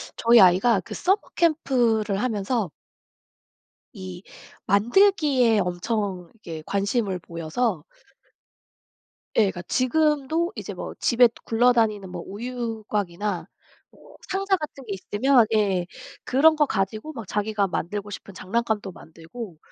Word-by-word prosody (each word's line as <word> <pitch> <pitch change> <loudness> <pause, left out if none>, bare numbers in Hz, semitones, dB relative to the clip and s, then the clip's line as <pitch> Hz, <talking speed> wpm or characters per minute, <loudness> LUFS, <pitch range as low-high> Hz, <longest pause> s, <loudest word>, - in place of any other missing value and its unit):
저희 235 0 +5
아이가 190 +4 +5
그 - - -9
서머 385 +3 +2 0.2
캠프를 240 - +1
하면서 215 - -1 1.2
이 185 -2 -9 0.4
만들기에 250 - +3
엄청 180 0 -2
이렇게 165 -8 -9
관심을 200 -1 -1
보여서 170 +3 -2 1.5
예 220 - +6
그러니까 190 -3 -2
지금도 300 - +1
이제 - - -6
뭐 - - -6
또 - - -28
집에 245 0 +5 0.2
굴러다니는 225 -4 +2
뭐 180 -1 -6
우유곽이나 210 -4 -4 0.4
뭐 - - -18
상자 390 0 +1
같은 300 -4 -8
게 205 - -4
있으면 230 +6 +3
예 195 -4 +1 0.4
그런 310 +5 +5
거 295 - +4
가지고 215 +7 -3
막 230 -6 -7
자기가 210 0 0
만들고 205 +3 -4
싶은 200 0 -9
장난감도 210 +1 -2
만들고 165 +4 -10
215 Hz, 265 characters per minute, -24 LUFS, 195-250 Hz, 1.5 s, 예